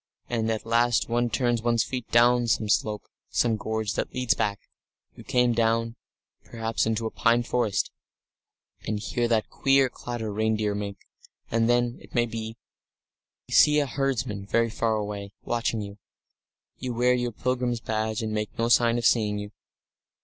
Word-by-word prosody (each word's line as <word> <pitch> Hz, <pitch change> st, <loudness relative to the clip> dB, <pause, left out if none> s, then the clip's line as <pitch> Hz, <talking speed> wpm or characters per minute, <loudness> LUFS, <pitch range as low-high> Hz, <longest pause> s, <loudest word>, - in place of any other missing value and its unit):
And 115 Hz, -2 st, 0 dB
at 110 Hz, -1 st, -2 dB
last 120 Hz, +1 st, +2 dB
one 120 Hz, +1 st, +1 dB
turns 120 Hz, 0 st, 0 dB
one's 115 Hz, -1 st, +2 dB
feet 125 Hz, -2 st, -5 dB
down 120 Hz, +1 st, +4 dB
some 110 Hz, -1 st, +1 dB
slope, 105 Hz, 0 st, +1 dB, 0.3 s
some 115 Hz, -2 st, +2 dB
gorge 110 Hz, -1 st, -2 dB
that -, -, -2 dB
leads 125 Hz, -2 st, +2 dB
back. 100 Hz, -1 st, -1 dB, 0.5 s
You -, -, -13 dB
come 125 Hz, -1 st, +2 dB
down, 115 Hz, 0 st, +1 dB, 0.5 s
perhaps, 115 Hz, -1 st, -2 dB
into 115 Hz, 0 st, -1 dB
a 110 Hz, -, -2 dB
pine 120 Hz, 0 st, +2 dB
forest, 115 Hz, -4 st, 0 dB, 1.0 s
and 105 Hz, -1 st, -1 dB
hear 120 Hz, +3 st, -1 dB
that 115 Hz, -2 st, 0 dB
queer 135 Hz, -1 st, +3 dB
clatter 115 Hz, -4 st, -5 dB
reindeer 110 Hz, -1 st, 0 dB
make 100 Hz, -1 st, -4 dB, 0.5 s
and 115 Hz, 0 st, +2 dB
then, 120 Hz, 0 st, +1 dB
it -, -, -15 dB
may 120 Hz, -1 st, +3 dB
be, 115 Hz, -1 st, -6 dB, 0.9 s
see 150 Hz, 0 st, +6 dB
a 145 Hz, -, +3 dB
herdsman 130 Hz, -7 st, -2 dB
very 115 Hz, +1 st, +1 dB
far 110 Hz, 0 st, 0 dB
away, 105 Hz, -1 st, -4 dB
watching 115 Hz, -2 st, -1 dB
you. 100 Hz, 0 st, -8 dB, 0.8 s
You 125 Hz, -2 st, -4 dB
wear 125 Hz, +1 st, +3 dB
your 125 Hz, -1 st, -1 dB
pilgrim's 125 Hz, +1 st, -1 dB
badge, 110 Hz, 0 st, -2 dB
and 110 Hz, -, -2 dB
he -, -, -3 dB
makes 105 Hz, -1 st, -3 dB
no 115 Hz, +1 st, +1 dB
sign 120 Hz, -1 st, +4 dB
of 120 Hz, -, -2 dB
seeing 105 Hz, -3 st, +3 dB
you.... 105 Hz, 0 st, -6 dB
115 Hz, 165 wpm, -26 LUFS, 110-120 Hz, 1.0 s, see